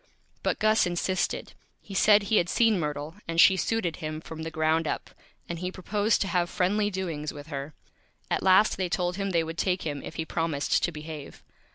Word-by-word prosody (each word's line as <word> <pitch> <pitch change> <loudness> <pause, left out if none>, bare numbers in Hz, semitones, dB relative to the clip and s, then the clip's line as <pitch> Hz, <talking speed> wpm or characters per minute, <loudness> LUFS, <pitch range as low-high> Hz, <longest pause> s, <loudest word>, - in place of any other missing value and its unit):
But - - 0
Gus 215 -2 +3
insisted. 175 +1 -1 0.3
He 200 - -11
said 205 +1 +5
he 210 +2 +2
had 175 - +2
seen 225 -3 +3
Myrtle, 150 +2 -4
and 165 0 -1
she 190 - +8
Suited 190 -3 -1
him 155 0 -4
from 160 0 -8
the 160 - -4
Ground 160 0 +1
up, - - -3 0.4
and 170 -1 -4
he 180 +1 -3
proposed 205 +4 0
to 195 - +1
have 175 -1 +1
Friendly 205 +4 +1
Doings 170 -6 -3
with 145 +1 -10
her. 140 0 -5 0.6
At - - +1
last 190 +3 +5
they 185 -2 -1
told 180 +1 -1
him 195 0 -1
they 170 -3 +2
would 165 +1 -6
take 185 -1 0
him 145 -3 -3
if - - -8
he 160 - -3
promised 160 -3 0
to 175 - 0
Behave. 155 -2 -9
175 Hz, 205 wpm, -27 LUFS, 160-190 Hz, 0.6 s, she